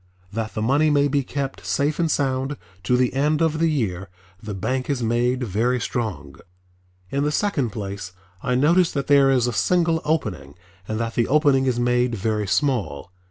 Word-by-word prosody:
That 110 0 -4
the 110 - -1
money 145 +6 +3
may 145 -1 +3
be 140 0 +1
kept 135 +1 -4
safe 145 +3 0
and 165 -1 +1
sound 135 -1 -1 0.3
to 125 +4 +3
the 125 -1 +1
end 150 +3 +1
of 160 -1 +1
the 165 0 +3
year 95 - -2 0.3
the 105 -2 -6
bank 130 +8 -2
is 135 -4 -1
made 120 +3 +1
very 120 +4 0
strong. 90 - -4 0.7
In 140 +1 0
the 150 - +1
second 150 - 0
place 100 -2 -6 0.3
I 125 -2 0
notice 165 +6 +3
that 140 -2 -2
there 140 -1 +5
is 130 -3 +3
a 120 - -1
single 165 +3 +2
opening 155 - -2 0.3
and 110 0 -3
that 115 0 -2
the 115 - +1
opening 140 -3 +3
is 125 -2 +1
made 125 0 +1
very 105 0 -1
small. 100 - -1
130 Hz, 185 wpm, -23 LUFS, 115-145 Hz, 0.7 s, there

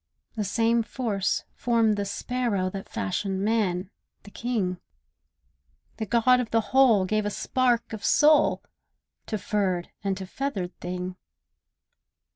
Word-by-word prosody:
The 215 - -1
same 230 +3 +2
Force 220 -4 -1
formed 230 -3 +2
the 205 0 -2
sparrow 200 -3 -1
That 195 0 -7
fashioned 190 - -2
man, 200 -4 0 0.3
the 205 - -13
king; 205 -8 -2 1.2
The 220 -1 -3
God 245 +3 +4
of 245 -3 -2
the 225 -2 0
Whole 245 -8 +5
gave 215 +3 0
a 205 - -1
spark 240 +1 0
of 210 -2 -6
soul 300 0 +4 0.6
To 215 - -2
furred 190 -4 -1
and 195 -1 -1
to 190 - -6
feathered 190 -5 -4
thing. 180 +1 -5
210 Hz, 130 wpm, -26 LUFS, 190-235 Hz, 1.2 s, Whole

